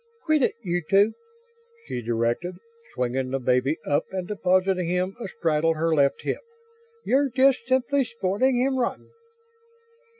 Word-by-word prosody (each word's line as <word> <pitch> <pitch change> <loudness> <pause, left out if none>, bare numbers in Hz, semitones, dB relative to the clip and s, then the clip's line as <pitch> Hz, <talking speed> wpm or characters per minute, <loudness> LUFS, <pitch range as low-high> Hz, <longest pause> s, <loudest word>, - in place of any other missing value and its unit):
"Quit 310 -3 +3
it, - - +1
you 175 -2 -1
two," 200 +3 +4 0.7
she 120 - -4
directed, 120 +10 -1 0.4
swinging 130 +1 -1
the 135 - -1
baby 130 +3 +1
up 145 +2 +1
and 185 -2 -4
depositing 185 -2 +1
him 180 +2 -1
a - - -4
straddle 165 -2 0
her 165 +1 0
left 140 -2 +2
hip. - - -2 0.6
"You're 275 +2 +2
just 260 -1 +3
simply 265 +2 +2
spoiling 235 +2 0
him 265 +1 +1
rotten." 240 - -3
185 Hz, 140 wpm, -25 LUFS, 145-240 Hz, 0.7 s, two